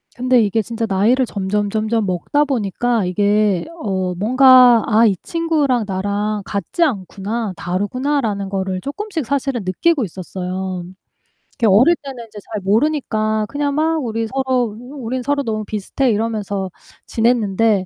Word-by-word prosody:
근데 250 0 +3
이게 215 +1 +1
진짜 225 +1 -3
나이를 220 +7 +2
점점점점 210 +2 -1
먹다 185 +11 0
보니까 240 -4 0
이게 205 0 +1 0.2
어 185 -3 -1
뭔가 250 +3 +6
'아 225 +1 +4
이 200 - +3
친구랑 300 -9 0
나랑 205 +2 -2
같지 200 - -1
않구나. 210 - -2
다르구나.'라는 205 - -2
거를 190 -1 -2
쪼끔씩 325 - -4
사실은 270 -2 -1
느끼고 265 - +1
있었어요. 185 0 -5 0.7
그게 230 - 0
어릴 240 - +5
때는 255 -4 -7
인제 215 -2 -11
잘 215 -3 -3
모르니까 215 -1 +1
그냥 285 0 -2
막 315 -1 +1
"우리 225 -1 -2
서로 255 -4 -1 0.2
우린 255 -2 -4
서로 285 +2 0
너무 215 -3 -2
비슷해." 215 +5 -1
이러면서 205 -3 -2 0.4
지냈는데 225 -3 +1
220 Hz, 315 characters per minute, -19 LUFS, 200-255 Hz, 0.7 s, 뭔가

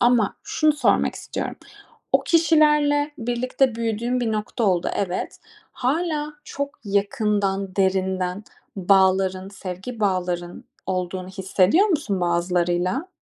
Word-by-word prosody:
ama 240 -4 +3
şunu 310 -1 +2
sormak 295 - +2
istiyorum: - - -5 0.6
O - - +5
kişilerle 300 -3 +3
birlikte 245 +1 0
büyüdüğün 230 +2 -1
bir 225 -2 0
nokta 215 +2 -2
oldu, 180 -3 +1
evet. 185 -2 -3 0.3
Hâlâ 300 +2 -1
çok 280 0 -5
yakından, 200 -1 0
derinden 190 0 0 0.3
bağların, 190 0 +3
sevgi 195 +4 -7
bağların 180 -3 -1 0.2
olduğunu 185 0 -3
hissediyor 190 - +2
musun 255 - 0
bazılarıyla? 175 - 0
200 Hz, 105 wpm, -23 LUFS, 185-255 Hz, 0.6 s, O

